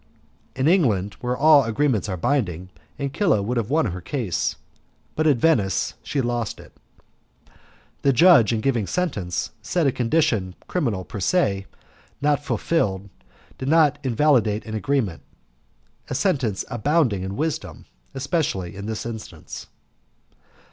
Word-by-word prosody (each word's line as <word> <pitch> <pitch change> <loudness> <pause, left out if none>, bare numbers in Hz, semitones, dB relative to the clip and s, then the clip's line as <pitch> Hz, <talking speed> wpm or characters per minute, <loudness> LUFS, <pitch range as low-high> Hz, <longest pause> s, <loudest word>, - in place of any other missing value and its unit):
In 130 +2 +1
England, 115 - +2
where 125 0 -1
all 150 -1 +6
agreements 115 -2 0
are 95 - -2
binding, 90 - -1 0.3
Ancilla 140 - +1
would 120 +4 -2
have 115 -1 -1
won 160 +3 +2
her 90 -4 -4
case, 95 - -2 0.6
but 155 0 +1
at 145 -4 +4
Venice 115 - +2
she 140 - -2
lost 120 -3 -2
it. - - -14 1.3
The 140 - +4
judge, 140 - +6
in 110 -2 0
giving 120 -5 0
sentence, 105 - -2
said 165 +9 0
a 135 - +4
condition, 115 - 0
criminal 115 - -1
per 105 - -7
se, 100 - +1 0.5
not 145 0 +1
fulfilled, 105 - -1 0.5
did 130 - -3
not 150 -2 +4
invalidate 120 -5 +2
an 110 - -7
agreement 110 -5 -1 0.9
a - - -2
sentence 115 -9 0
abounding 120 - +1
in 95 +2 -5
wisdom, 160 0 -3 0.3
especially 135 - -2
in 100 +1 -6
this 110 0 -4
instance. 115 -2 -8
120 Hz, 135 wpm, -23 LUFS, 100-145 Hz, 1.3 s, all